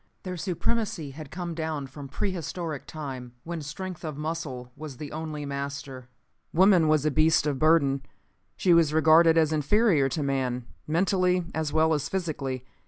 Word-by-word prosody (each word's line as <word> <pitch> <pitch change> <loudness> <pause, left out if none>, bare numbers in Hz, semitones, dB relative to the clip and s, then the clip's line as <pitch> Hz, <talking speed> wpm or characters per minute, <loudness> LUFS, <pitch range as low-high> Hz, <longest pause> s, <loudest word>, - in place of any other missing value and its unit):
Their 185 -1 -4
supremacy 180 -2 -2
had 150 +1 -9
come 175 0 -5
down 160 -3 -3
from 140 +1 -9
pre 190 +8 -2
historic 170 -3 -5
time, 130 -6 -7
when 170 -1 -5
strength 180 +5 -6
of 155 -3 -5
muscle 150 -6 -4
was 145 -3 -8
the 150 -1 -7
only 155 -1 -5
master. 140 -2 -5 0.4
Woman 185 -2 +5
was 155 -1 +3
a 155 - +3
beast 155 +1 +3
of 145 -3 -1
burden. 145 -3 +4 0.6
She 180 - +4
was 160 -2 +4
regarded 160 +1 +6
as 160 -1 +3
inferior 155 -1 +3
to 145 +3 -2
man, 130 -3 -1 0.2
mentally 180 +2 +2
as 160 -2 -1
well 160 0 +3
as 150 -1 -1
physically. 140 -9 -3
155 Hz, 165 wpm, -27 LUFS, 140-170 Hz, 0.6 s, regarded